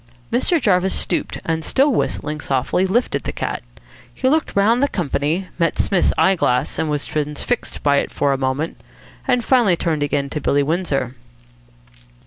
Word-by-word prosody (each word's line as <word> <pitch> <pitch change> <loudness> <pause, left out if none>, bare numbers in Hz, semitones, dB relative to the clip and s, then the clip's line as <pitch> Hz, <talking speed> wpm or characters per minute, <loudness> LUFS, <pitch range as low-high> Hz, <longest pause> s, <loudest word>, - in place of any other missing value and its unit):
Mr. 325 +8 +2
Jarvis 190 -5 +2
stooped, 175 - -1
and, 160 -1 -1
still 275 - +2
whistling 150 -8 -2
softly, 135 +8 0
lifted 235 +6 0
the - - -4
cat. - - -3 0.5
He 260 - -2
looked 310 +3 +1
round 220 +5 +3
the 280 - +4
company, 165 - -1
met 165 -1 +1
Psmith's 190 -3 +2
eye 190 - +5
glass, 125 -8 0
was 150 -2 -1
transfixed 150 +10 -3
by 145 -1 +4
it - - 0
for 140 -1 +1
a - - +1
moment, 135 +4 -2 0.5
and 250 -3 +2
finally 235 -9 +4
turned 165 -3 -1
again 145 -1 0
to 150 - -3
Billy 140 +1 +2
Windsor. 145 -5 -1
165 Hz, 160 wpm, -20 LUFS, 145-210 Hz, 0.5 s, eye